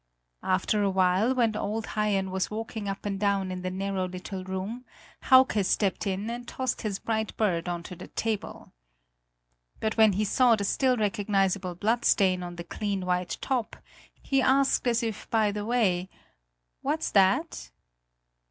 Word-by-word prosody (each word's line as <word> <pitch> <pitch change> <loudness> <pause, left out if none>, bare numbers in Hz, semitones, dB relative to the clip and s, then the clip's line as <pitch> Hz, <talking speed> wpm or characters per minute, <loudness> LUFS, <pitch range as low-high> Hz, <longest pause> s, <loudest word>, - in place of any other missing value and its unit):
After 190 +3 +1
a 200 - +2
while, 190 +6 +2
when 230 -4 +2
old 215 +1 -2
Haien 200 -3 0
was 190 -1 -1
walking 220 -1 -5
up 195 +1 -5
and 200 -1 -2
down 200 -2 0
in 180 0 -5
the 185 - -3
narrow 190 0 -2
little 185 +1 -6
room, 190 +6 -5 0.4
Hauke 260 -5 +5
stepped 195 +1 0
in 195 +2 -2
and 240 +1 -5
tossed 260 0 -3
his 210 -4 -2
bright 220 0 -3
bird 180 -5 0
on 175 -1 -3
to 180 - -8
the 180 - -10
table. 220 -3 -4 1.1
But 220 +1 -2
when 220 -2 +6
he 210 +3 0
saw 245 +2 +4
the 205 - -3
still 255 +5 +2
recognizable 195 -3 0
bloodstain 200 -2 +2
on 175 -1 -6
the 170 - -6
clean 195 +1 -3
white 180 -1 -1
top, 250 -5 -2 0.5
he 270 -1 +2
asked 270 0 +3
as 235 0 +2
if 225 -3 -4
by 220 -2 +2
the 205 0 -4
way: 195 -6 +1 0.7
"What's - - -1
that?" - - +2
205 Hz, 160 wpm, -27 LUFS, 185-225 Hz, 1.1 s, when